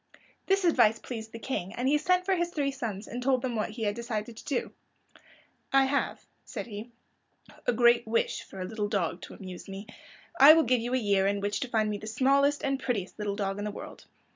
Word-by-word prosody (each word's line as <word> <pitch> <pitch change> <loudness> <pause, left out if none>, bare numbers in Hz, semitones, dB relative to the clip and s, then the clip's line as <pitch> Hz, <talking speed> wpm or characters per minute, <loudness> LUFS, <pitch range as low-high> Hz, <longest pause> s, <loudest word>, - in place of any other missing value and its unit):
This 390 -1 +2
advice 235 -10 +4
pleased 220 -2 -7
the 230 - -7
King, 210 -6 -4
and 250 +2 -1
he 295 +2 +3
sent 365 +3 +2
for 385 - +2
his 345 -1 0
three 285 -5 -1
sons, 225 -6 -5
and 245 +2 -5
told 260 0 +2
them 250 -2 -2
what 215 - -1
he 220 +1 -6
had 205 -1 +1
decided 230 -1 -4
to - - -12
do. 275 -4 -2 1.0
"I 270 0 +5
have," 280 +1 -1 0.2
said - - -6
he, 215 0 -8 0.8
"a - - +5
great 235 0 +4
wish 230 +1 0
for 190 - -11
a 185 - -3
little 210 +1 -3
dog 180 -4 -1
to - - -9
amuse 185 0 -9
me. 195 +2 -7 0.5
I 285 +3 +11
will 325 0 +4
give 250 -1 +2
you 245 +2 -1
a - - +3
year 200 -4 +2
in 200 0 0
which 205 +1 -1
to 260 - -3
find 220 -2 +1
me 210 -1 -2
the 215 - -8
smallest 275 +5 +2
and 275 -1 0
prettiest 215 -7 -3
little 205 -1 -2
dog 195 -1 -2
in - - -3
the 210 - -2
world. 205 - -9
230 Hz, 230 wpm, -29 LUFS, 205-270 Hz, 1.0 s, I